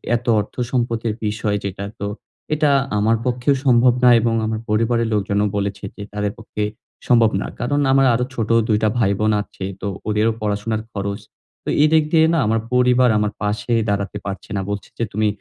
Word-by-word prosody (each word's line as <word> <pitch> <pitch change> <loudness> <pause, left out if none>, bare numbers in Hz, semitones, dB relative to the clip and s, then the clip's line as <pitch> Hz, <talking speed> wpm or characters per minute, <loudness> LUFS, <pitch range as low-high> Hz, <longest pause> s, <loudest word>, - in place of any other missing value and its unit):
এত 120 - -4
অর্থ 105 - -5 0.2
সম্পতির 115 -3 -1
বিষয় 105 -1 -1
যেটা, 100 +1 -4
তো 100 - -3 0.5
এটা 150 -1 +2 0.3
আমার 110 +2 +3
পক্ষেও 125 +3 +1
সম্ভব 125 -1 +5
না 125 - +8
এবং 115 0 +1
আমার 110 0 -2
পরিবারের 115 +2 +1
লোকজনও 105 0 +1
বলেছে 100 0 -3
কি - - -11
তাদের 105 -1 -1
পক্ষে 105 -2 -5 0.4
সম্ভব 115 -3 +5
না। - - -3
কারণ, 145 +4 0
আমার 135 0 +4
আরো 125 +2 +1
ছোট 115 -3 -3 0.2
২ 105 -2 +3
টা 110 - +4
ভাই 100 -4 +2
বোন 110 0 +2
আছে। 95 -1 -10 0.2
তো 100 - -3 0.2
ওদেরও 105 +2 +2
পড়াশোনার 105 +1 -1
খরচ। 100 0 -3 0.4
তো - - -5
এদিক 155 0 +4
দিয়ে 160 -1 +5
না - - +2
আমার 115 +1 +2
পরিবার 125 0 +4
আমার 105 0 0
পাশে 105 +3 -1 0.2
দাঁড়াতে 100 0 -2
পারছে 95 -1 -6
না। - - -1
বলছে 100 -1 -4
যে - - +1
তুমি 110 +1 +1
110 Hz, 185 wpm, -20 LUFS, 105-120 Hz, 0.5 s, না